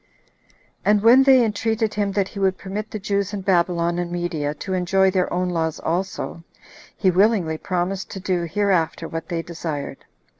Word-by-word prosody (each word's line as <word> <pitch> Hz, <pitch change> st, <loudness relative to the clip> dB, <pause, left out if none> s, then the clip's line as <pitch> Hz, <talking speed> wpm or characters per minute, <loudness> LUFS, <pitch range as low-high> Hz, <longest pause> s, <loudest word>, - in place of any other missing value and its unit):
And 210 Hz, 0 st, +3 dB
when 240 Hz, +4 st, +7 dB
they 265 Hz, -3 st, +6 dB
entreated 220 Hz, +1 st, -1 dB
him 205 Hz, -1 st, 0 dB
that 195 Hz, -1 st, 0 dB
he 200 Hz, -, -8 dB
would 190 Hz, -1 st, +1 dB
permit 205 Hz, +3 st, -5 dB
the -, -, -5 dB
Jews 200 Hz, 0 st, -2 dB
in 200 Hz, -, -3 dB
Babylon 175 Hz, -2 st, +1 dB
and 175 Hz, -1 st, -3 dB
Media 165 Hz, -4 st, -2 dB
to 190 Hz, -, -5 dB
enjoy 190 Hz, +1 st, +2 dB
their 185 Hz, -1 st, 0 dB
own 180 Hz, 0 st, 0 dB
laws 160 Hz, -2 st, -1 dB
also, 175 Hz, -1 st, -3 dB, 0.5 s
he 190 Hz, -, +3 dB
willingly 185 Hz, -4 st, +2 dB
promised 185 Hz, +1 st, -2 dB
to 195 Hz, -, -6 dB
do 180 Hz, -2 st, -1 dB
hereafter 190 Hz, -3 st, 0 dB
what 165 Hz, +1 st, -6 dB
they 170 Hz, -2 st, -2 dB
desired. 155 Hz, -5 st, -6 dB
185 Hz, 175 wpm, -22 LUFS, 170-205 Hz, 0.5 s, when